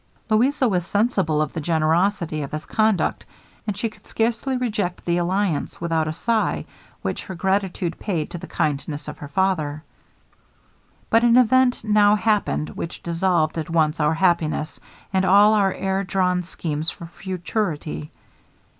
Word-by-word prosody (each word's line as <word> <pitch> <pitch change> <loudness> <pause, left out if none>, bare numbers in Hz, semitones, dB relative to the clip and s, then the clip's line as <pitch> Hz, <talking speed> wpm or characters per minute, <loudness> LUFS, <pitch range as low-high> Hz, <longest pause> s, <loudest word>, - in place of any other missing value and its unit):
Louisa 255 +5 +3
was 180 -5 +1
sensible 195 -9 +1
of 150 - -6
the 165 - -3
generosity 165 +1 +1
of 140 - -6
his 155 - -4
conduct, 215 -3 +1 0.4
and 205 -2 -2
she 230 - 0
could 220 - -14
scarcely 235 +4 0
reject 210 -7 -2
the 170 0 +1
alliance 180 -2 -1
without 165 -2 0
a - - -1
sigh, 220 +6 0 0.4
which - - -3
her 190 - -6
gratitude 190 -2 -1
paid 170 -7 -2
to 175 - -5
the - - -9
kindness 145 0 -2
of - - -7
her 145 - -7
father. 155 -3 0 1.3
'But 230 +1 +5
an 240 0 +5
event 255 0 +4
now 210 -1 +4
happened 210 -7 0
which 170 - -6
dissolved 170 -2 +1
at 155 - -5
once 160 -1 +1
our 150 +1 +2
happiness, 165 -3 0 0.3
and 190 0 +2
all 205 +3 +6
our 200 -3 +3
air 190 +1 -1
drawn 180 -1 +1
schemes 160 -2 -3
for 170 - -8
futurity. 170 -3 -4
185 Hz, 155 wpm, -23 LUFS, 160-210 Hz, 1.3 s, all